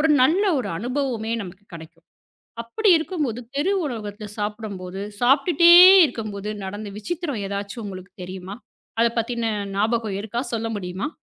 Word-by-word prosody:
ஒரு 320 - +3
நல்ல 345 +10 +3
ஒரு 230 - -3
அனுபவமே 245 -2 -2
நமக்குக் 190 +1 -12
கிடைக்கும். 165 0 -13 0.6
அப்படி 415 - -1
இருக்கும்போது 300 - -3 0.2
தெரு 355 +8 +1
உணவகத்தில் 210 -5 -6
சாப்பிடும்போது 205 -3 -5 0.2
சாப்பிட்டுட்டே 285 +7 +5 0.3
இருக்கும்போது 215 -6 -4
நடந்த 205 +2 -6
விசித்திரம் 285 - -4
எதாச்சு 200 +3 -5
உங்களுக்குத் 185 -2 -9
தெரியுமா? 185 +2 -8 0.4
அதைப் 235 0 +2
பத்தின்ன 230 0 -1 0.3
ஞாபகம் 215 -1 0
இருக்கா? 230 +4 -3
சொல்ல 225 0 -2
முடியுமா? 185 +5 -4
220 Hz, 130 wpm, -23 LUFS, 200-255 Hz, 0.6 s, சாப்பிட்டுட்டே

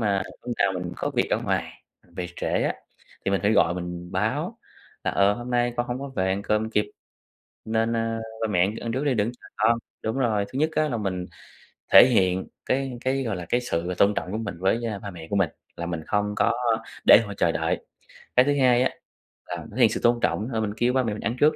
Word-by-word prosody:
mà 100 -3 +1 0.2
lúc 120 -1 -3
nào 100 - +3
mình 90 -1 -4
có - - -2
việc - - 0
ở - - +2
ngoài - - -2 0.3
về 90 - -3
trễ - - -3 0.2
á, - - 0 0.5
thì 100 - +1
mình 100 - +1
phải 105 - +3
gọi 85 -5 +4
mình 90 0 -6
báo - - -1 0.5
là - - +1
"Ờ, 100 0 +4
hôm 120 +3 -7
nay 120 0 +2
con 120 - 0
hông 120 0 -3
có 140 +1 -5
về 95 -9 -1
ăn 95 +1 -1
cơm 105 +2 0
kịp, 105 -1 +1 0.8
nên, 115 +1 +1
ơ, 115 0 -1 0.2
ba 110 - +1
mẹ 90 - +1
ăn 100 +4 +1
ăn 115 - -3
trước 130 +4 -1
đi 145 -3 +2
đừng 105 -3 +1
có - - -16
chờ - - -13
con." 115 +2 +3 0.3
Đúng 110 +4 -1
rồi, 110 -6 +1
thứ 135 - -2
nhất 155 +1 +3
á 155 -1 +1
là 120 - -1
mình 95 -4 -2 0.7
thể - - +11
hiện 95 -6 +2 0.2
cái 130 -1 -1
cái, 135 +1 +1
gọi 110 -5 -2
là, 90 -1 -6
cái 120 - +2
sự 90 -6 -2
tôn 100 +1 +4
trọng 90 - -3
của 110 - -2
mình 115 -6 -4
với, 95 +5 +2
a, 105 -3 -4
ba 100 - -7
mẹ 85 -3 -10
của - - -1
mình, 100 - +3 0.3
là 85 - -3
mình 85 -2 -3
không 105 0 0
có, - - +3 0.3
a, 110 - -12 0.2
để - - +10
họ 105 - -6
chờ 85 - +3
đợi. - - -1 0.5
Cái 125 - +7
thứ 145 - +3
hai 125 -1 +5
á 130 - +2 0.6
là - - -5
thể - - -10
hiện - - +7
sự - - -2
tôn 120 0 +4
trọng 100 +7 0
thôi 110 -2 0
mình 105 -1 -2
kêu 120 +2 +2
ba 130 - +2
mẹ 110 -3 -1
mình 105 - -6
ăn 115 - -1
trước 150 +1 +5
110 Hz, 255 wpm, -25 LUFS, 95-120 Hz, 0.8 s, thể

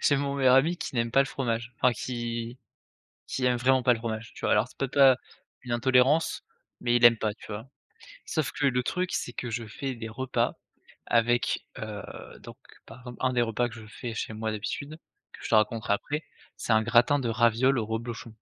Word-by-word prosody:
j'ai 145 - +4
mon 140 0 -1
meilleur 130 -2 +4
ami 155 +7 +4
qui 165 - -5
n'aime 115 -1 0
pas 135 - +4
le 135 - +3
fromage, 120 -3 -3
enfin, 125 - +3
qui 120 0 -4 0.7
qui 130 - -3
aime 125 -1 +3
vraiment 130 +2 +3
pas 125 - +5
le - - -6
fromage, 115 -1 -5
tu - - -11
vois? - - +3
Alors, - - +3
c'est - - -20
peut-être 135 -1 -3
pas 135 -2 +8 0.5
une 125 -2 -5
intolérance, 130 +6 +3 0.4
mais 120 -1 +1
il 120 - +3
aime 115 -1 +6
pas, 110 -1 -1
tu - - -14
vois? 110 +2 -6 0.6
Sauf 155 -4 -2
que 145 - 0
le 125 -2 +2
truc, 180 +5 -1
c'est 120 - -2
que 120 0 -5
je 115 0 -4
fais 130 +5 -5
des 115 -1 -6
repas 130 +3 -1 0.5
avec, 120 +1 +1
heu, 105 -2 -6 0.4
donc - - -11 0.3
par 125 +1 -13
1 130 0 +1
des 120 -1 +2
repas 120 +1 0
que 115 - -11
je 110 -2 -11
fais 115 +2 -7
chez 110 - -4
moi, 110 0 -3
d'habitude, 140 +8 -5 0.4
que - - -13
je - - -4
te - - +1
raconterai 110 -1 +2
après. 150 +9 -3 0.3
C'est - - -2
un 110 0 +4
gratin 120 +5 +4
de 125 -4 -2
ravioles 120 +3 +3
au 110 - -3
reblochon. 115 +2 -5
120 Hz, 215 wpm, -27 LUFS, 115-130 Hz, 0.7 s, pas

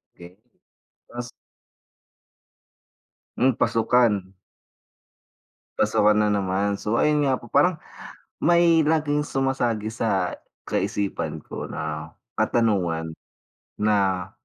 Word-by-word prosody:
Okey, 90 +1 -14 0.7
ta's 120 0 -7 2.1
Hmm, 130 +2 +3
pasukan. 110 -5 +2 1.5
Pasukan 105 0 +3
na 105 - +2
naman, 100 0 0
so 105 +3 -1
ayun 150 -1 +2
nga 130 -2 +1
po 120 - -13
parang, 155 +6 +2 0.6
may 170 -2 +4
laging 150 -2 +1
sumasagi 120 -5 -1
sa 105 -5 0 0.3
kaisipan 80 -6 -2
ko - - -7
na 75 0 -6 0.2
katanungan, 90 -8 +1 0.7
na 95 -3 0
110 Hz, 85 wpm, -24 LUFS, 95-135 Hz, 2.1 s, may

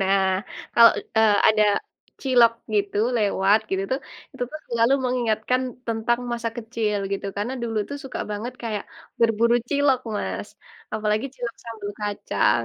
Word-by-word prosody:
Nah, 195 0 +3 0.5
kalau, 235 -1 +9 0.3
e - - +7 0.3
ada 215 -1 +4 0.6
cilok 245 -4 +5 0.2
gitu 205 -1 0 0.2
lewat, 205 -1 +3
gitu 190 0 0
tuh, 265 - 0 0.3
itu - - -6
tuh 310 - -6
selalu 235 +2 +3
mengingatkan 245 -1 +1 0.3
tentang 230 +1 0
masa 235 -1 -1
kecil, 225 -3 -1
gitu. 200 0 -2
Karena 210 +5 -2
dulu 225 -1 -3
itu 285 - -7
suka 270 - -5
banget 215 +4 -4
kayak 215 -3 -3 0.4
berburu 230 +1 +4
cilok, 285 -2 +3 0.2
Mas. - - -3 0.5
Apalagi 215 +3 0
cilok 240 -2 -5
sambal 220 -3 -6
kacang, 200 - +1
225 Hz, 140 wpm, -24 LUFS, 210-240 Hz, 0.6 s, kalau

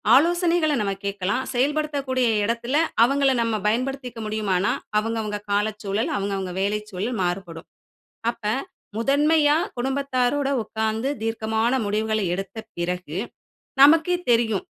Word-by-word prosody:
ஆலோசனைகள 340 0 +3
நம்ம 200 -1 0
கேட்கலாம். 200 +4 -1
செயல்படுத்தக்கூடிய 275 -1 0 0.2
எடத்துல 235 +5 0 0.3
அவங்கள 275 +2 +3
நம்ம 230 -1 0
பயன்படுத்திக்க 250 +1 -2
முடியுமானா, 205 -3 0 0.3
அவங்க 225 +1 -2
அவங்க 210 -1 -3
காலச் 210 +1 0
சூழல், 200 +3 -1
அவங்க 200 0 -2
அவங்க 185 -2 -4
வேலைச் 210 +2 -1
சூழல் 205 +6 -3
மாறுபடும். 175 -2 -4 0.6
அப்ப, 235 - -22 0.5
முதன்மையா 295 +4 +3 0.2
குடும்பத்தாரோட 270 +1 0 0.2
உட்கார்ந்து 220 +3 -2
தீர்க்கமான 225 +1 0
முடிவுகள 215 +1 0
எடுத்த 195 +4 -5 0.2
பிறகு, 180 -2 -3 0.6
நமக்கே 320 +5 +6 0.2
தெரியும் 225 -4 +2
225 Hz, 115 wpm, -24 LUFS, 205-275 Hz, 0.6 s, நமக்கே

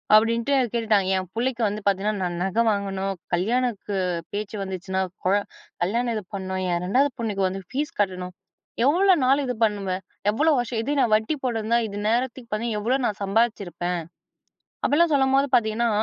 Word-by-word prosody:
அப்படின்ட்டு 230 +5 +3 0.2
கேட்டுட்டாங்க. 215 -5 +2
"என் 185 -2 -4
புள்ளைக்கு 245 +1 -1
வந்து 205 +1 -3
பாத்தீங்கன்னா, 200 +2 +1
நான் 175 -1 -2
நகை 195 +5 +1
வாங்கணும். 195 -1 -2 0.2
கல்யாணக்கு 210 +2 0 0.4
பேச்சு 210 +1 -4
வந்துச்சுனா, 190 0 -3 0.2
குழ 185 - +3 0.5
கல்யாணம் 235 +6 0
இது 215 - -3
பண்ணணும், 190 -1 -3
என் 175 - 0
2ஆவது 265 +9 +3
பொண்ணுக்கு 210 -4 -1
வந்து 195 +1 -5
ஃபீஸ் 295 +5 -3
கட்டணும், 185 -2 -1 0.5
எவ்ளோ 370 +7 +5
நாள் 270 +3 +4
இது 250 - -1
பண்ணுவ? 205 -3 0 0.4
எவ்வளோ 305 +9 +3
வருஷம்? 240 -1 -2
இது 275 - -2
நான் 235 - +2
வட்டி 220 +7 0
போட்டிருந்தா 230 -2 +1
இது 205 -1 -7
நேரத்துக்கு 240 +1 -1
பார்தீ 220 +3 -1
எவ்வளோ 240 +6 +1
நான் 210 -1 -4
சம்பாதிச்சிருப்பேன்" 195 -5 0 0.8
அப்படிலாம் 320 +2 +3
சொல்லும்போது 270 0 +3
பாத்தீங்கன்னா 230 0 +2
215 Hz, 155 wpm, -24 LUFS, 195-245 Hz, 0.8 s, எவ்ளோ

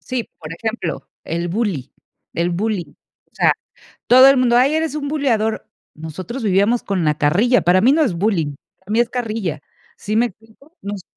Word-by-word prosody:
Sí, 250 -3 -4
por 155 - -9
ejemplo, 220 -2 -4 0.2
el 170 +1 -3
bullying 185 - -2 0.4
el 170 +1 0
bullying. 185 -3 -2 0.4
O - - -41
sea, - - +4 0.5
todo 255 +2 +8
el 275 - +5
mundo: 245 -2 +3
"Ay, 270 +5 +4
eres 320 -2 -1
un 290 -2 -3
buleador", 240 -7 0 0.3
nosotros 170 - -7
vivíamos 205 +3 +2
con 190 -4 -1
la 150 -1 +2
carrilla. 205 +12 +3
Para 180 +2 +4
mí 255 +6 +5
no 315 +2 +3
es 240 - +1
bullying, 170 -6 0 0.2
para 190 +2 -16
mí 225 - +3
es 240 - +2
carrilla, 215 - -3 0.4
¿sí 210 +1 -3
me 235 +2 +4
explico? 225 - -16
Nos 200 -1 -6
215 Hz, 185 wpm, -19 LUFS, 175-245 Hz, 0.5 s, todo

